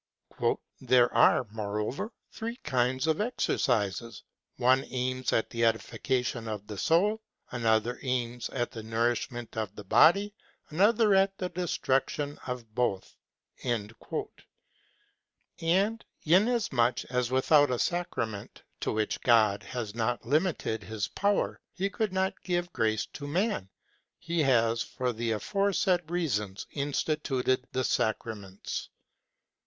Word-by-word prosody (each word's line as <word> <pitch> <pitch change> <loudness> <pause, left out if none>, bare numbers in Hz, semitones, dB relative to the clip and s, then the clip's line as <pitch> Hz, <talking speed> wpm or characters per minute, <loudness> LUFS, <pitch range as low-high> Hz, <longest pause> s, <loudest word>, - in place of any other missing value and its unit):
"There 125 -1 +4
are, 125 - +5
moreover, 105 - -3 0.2
three 230 +2 -5
kinds 130 +1 +1
of 160 +5 +1
exercises: 115 - 0 0.3
one 130 +2 +4
aims 130 0 -1
at 110 - +1
the 115 -1 -1
edification 115 +1 0
of 105 -2 -4
the 105 -2 -7
soul, 205 +7 +2 0.3
another 115 0 +1
aims 125 -2 -2
at 120 -2 -2
the 115 -4 -7
nourish 115 +1 0
ment 120 -1 -8
of 110 -3 -3
the 105 - -8
body, 200 - +5 0.4
another 210 +5 +4
at 195 0 +3
the 180 - -3
destruction 145 -4 -1
of 120 -4 -5
both.'' 110 -6 -1 0.5
вҖ" 115 -3 -3 1.3
And 195 +7 +2 0.2
inas 210 +8 +3
much 120 0 +2
as 125 -1 -1
without 145 +3 +4
a 125 - 0
sacrament, 115 - -3 0.2
to - - -1
which 110 -1 -1
God 110 -4 +4
has 115 -5 -5
not 120 +1 -1
limited 150 -4 0
his 110 -2 -3
power, 205 0 0
he 195 +2 -1
could 215 -2 -1
have 190 0 -1
given 175 -1 -1
grace 110 -1 +1
to 145 - -6
man, 175 - 0 0.5
he 170 0 -3
has 115 -4 +3
for 125 -1 -2
the 115 +1 -2
aforesaid 185 - +1
reasons 105 - -1
instituted 140 -2 0
the 130 - 0
sacraments. 105 -4 -2
125 Hz, 125 wpm, -29 LUFS, 115-170 Hz, 1.3 s, are